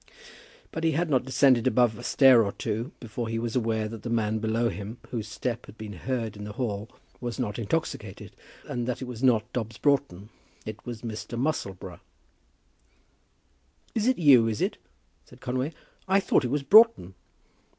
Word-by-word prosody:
But 165 - -5
he 160 -1 +2
had 165 +2 0
not 130 -2 +2
descended 130 -2 +4
above 120 -3 +3
a 120 - -10
stair 130 -2 +6
or 100 - -2
two 115 +6 -3
before 115 0 -5
he 115 0 -2
was 115 +1 -3
aware 110 -3 0
that 110 -1 -8
the 120 - -5
man 110 -1 0
below 115 +2 +1
him, 105 +3 -7
whose 110 -3 -3
step 120 +2 -4
had 110 - -13
been 110 -1 -7
heard 115 +2 -3
in 105 - -8
the 105 0 -7
hall, 110 -4 -3 0.3
was 120 -2 -4
not 120 -4 -3
intoxicated, 110 -4 -3 0.3
and 120 -1 -3
that 125 - -1
he 130 - -6
was 125 -2 -7
not 115 -5 +2
Dobbs 115 -3 -3
Broughton. 135 -9 0 0.4
It 110 +1 -7
was 120 -2 -6
Mr. 115 +1 -5
Musselboro. 95 - -3 1.9
"It - - 0
is 255 - +3
you, 135 -8 +6
is 110 -2 -2
it?" - - -1 0.5
said - - -17
Conway. 130 +4 -2 0.4
"I 190 +1 +4
thought 190 - +2
it - - -1
was 145 0 0
Broughton." 215 - +6
115 Hz, 180 wpm, -27 LUFS, 110-130 Hz, 1.9 s, stair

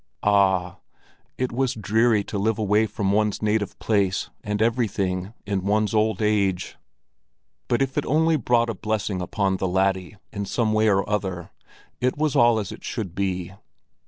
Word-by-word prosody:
Ah! 95 -3 +2 0.6
it 130 0 -1
was 130 +1 0
dreary 110 0 +2
to 100 - -4
live 110 +2 +1
away 105 0 +2
from 100 -1 -1
one's 105 0 +1
native 105 -1 0
place 100 -3 0
and 105 0 -2
everything 105 -4 0
in 100 -1 -1
one's 105 +1 +1
old 110 -1 +1
age; 100 -4 0 0.9
but 120 +3 +2
if 135 0 -4
it - - -4
only 160 +3 +3
brought 120 -3 +2
a - - -4
blessing 105 -2 -2
on 95 +1 0
the 95 - -1
laddie 95 +1 0 0.2
in 100 -1 -3
some 110 +1 0
way 110 0 +3
or 100 -1 +2
other, 95 -4 -3 0.5
it 125 +2 0
was 150 -2 0
all 120 -1 +5
as 105 -3 -3
it - - -10
should 100 -8 -4
be. 95 -2 -2
105 Hz, 165 wpm, -24 LUFS, 95-110 Hz, 0.9 s, all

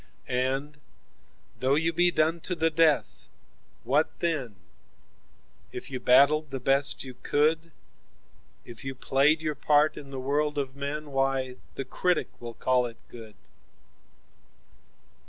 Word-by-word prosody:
17And 135 +4 -1 0.8
though 130 +2 +2
you 165 +2 +1
be 175 +2 +4
done 165 0 +1
to 180 +2 -4
the 165 0 +1
death, 150 - +1 0.5
what 140 +6 +2
then?18 145 -10 -2 1.2
If - - -7
you 130 - -3
battled 140 +5 +4
the 135 -1 -4
best 135 +2 +2
you 130 -1 -8
could,19If 145 - -4
you 135 0 -5
played 145 +5 +2
your 155 -1 -1
part 150 +1 +2
in 140 - -9
the 135 -1 -6
world 145 +3 0
of 135 -2 -3
men,20 145 +2 -4
Why, 135 -1 0 0.2
the 135 - -4
Critic 180 +6 0
will 120 -1 -7
call 125 -1 +1
it 115 -1 -11
good. 110 -3 -11
140 Hz, 130 wpm, -27 LUFS, 130-155 Hz, 1.2 s, be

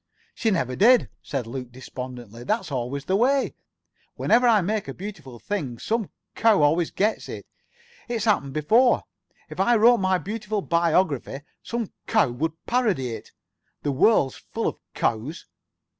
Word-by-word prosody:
"She 225 - 0
never 130 - 0
did," 240 - +5
said 135 -4 -3
Luke 125 +1 -6
despondently. 125 -2 -8
"That's 215 - -1
always 135 +2 -3
the 190 - +1
way. 265 +6 +2 0.6
Whenever 245 +1 +3
I 220 -4 +5
make 210 +1 -2
a 135 - -6
beautiful 175 - -8
thing, 140 - -4
some 220 - -2 0.2
cow 215 -8 +4
always 160 +3 +3
gets 215 +3 -1
it. - - -7 0.6
It's 230 -3 -2
happened 145 -11 +1
before. 225 - +3 0.4
If - - -10
I 240 - +4
wrote 235 +2 +6
my 185 -1 +2
beautiful 210 +1 -3
biography, 170 -5 +1 0.2
some 235 -3 -4
cow 210 - +3
would 160 +6 -4
parody 210 - +1
it. 110 - -9 0.5
The 145 - 0
world's 140 - +3
full - - -5
of - - -3 0.2
cows." 120 +9 -2
175 Hz, 150 wpm, -24 LUFS, 135-220 Hz, 0.6 s, wrote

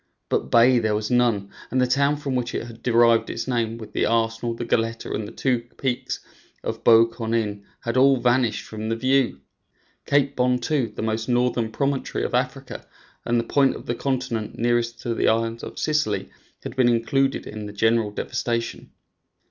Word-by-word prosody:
But - - 0
bay 120 +1 +5
there 110 -2 0
was 105 +3 -2
none, 115 -5 +2 0.2
and 130 - 0
the 125 - +4
town 140 +3 +2
from 145 -2 -4
which 125 -1 -2
it - - -2
had 115 -1 -11
derived 115 -1 +4
its - - -4
name, 115 -3 -1
with 110 -2 -10
the - - +1
Arsenal, 115 +1 0
the 120 - -5
Goletta, 115 0 -1
and 105 -1 -3
the - - -9
two 130 -3 0 0.2
peaks 130 -2 -2 0.4
of - - -4
Bou 115 0 +7
Kournein, 110 -3 -2 0.2
had 115 +1 -2
all 135 +1 +5
vanished 120 -2 +1
from 110 0 -5
the 115 - 0
view. 130 - +1 0.7
Cape 140 -1 +2
Bon, 125 0 +2
too, 125 -2 -1
the - - -4
most 110 +1 -2
northern 120 -2 +1
promontory 140 +2 -1
of - - -3
Africa - - -2 0.4
and 120 0 +2
the - - 0
point 135 +3 +2
of - - -9
the 120 - -1
continent 125 -4 -2
nearest 120 0 0
to 120 - -2
the - - +1
island 115 +1 +1
of - - -8
Sicily, 150 -9 0 0.3
had - - -6
been 130 -2 +4
included 135 +4 +1
in 105 0 -7
the - - -7
general 110 +1 +2
devastation. 115 +2 -3
120 Hz, 190 wpm, -23 LUFS, 115-130 Hz, 0.7 s, Bou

